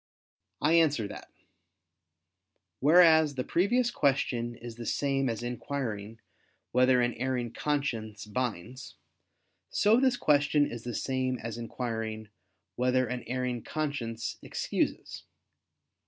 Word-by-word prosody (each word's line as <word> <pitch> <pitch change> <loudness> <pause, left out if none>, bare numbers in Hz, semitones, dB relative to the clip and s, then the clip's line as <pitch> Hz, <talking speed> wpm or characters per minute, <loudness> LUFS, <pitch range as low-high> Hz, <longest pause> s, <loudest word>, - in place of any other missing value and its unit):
I 155 +3 +3
answer 150 -10 +3
that, - - -10 1.5
Whereas 160 -1 +6
the 130 - -1
previous 240 - +2
question 120 - 0
is 120 -1 -9
the 120 - -7
same 135 -2 0
as 115 0 -3
inquiring 115 -3 -4 0.5
"whether 125 0 +4
an 120 0 0
erring 125 -1 -2
conscience 115 -8 -2
binds"; 120 +2 -4 0.7
so 215 +3 +4
this 260 -2 +3
question 145 -2 +3
is 120 -4 -7
the 120 -2 -4
same 130 +1 -1
as 115 0 -6
inquiring 110 -2 -4 0.5
"whether 125 +1 +2
an 125 +1 -4
erring 125 -1 -2
conscience 125 -8 -3
excuses." - - -3
125 Hz, 110 wpm, -29 LUFS, 115-145 Hz, 1.5 s, Whereas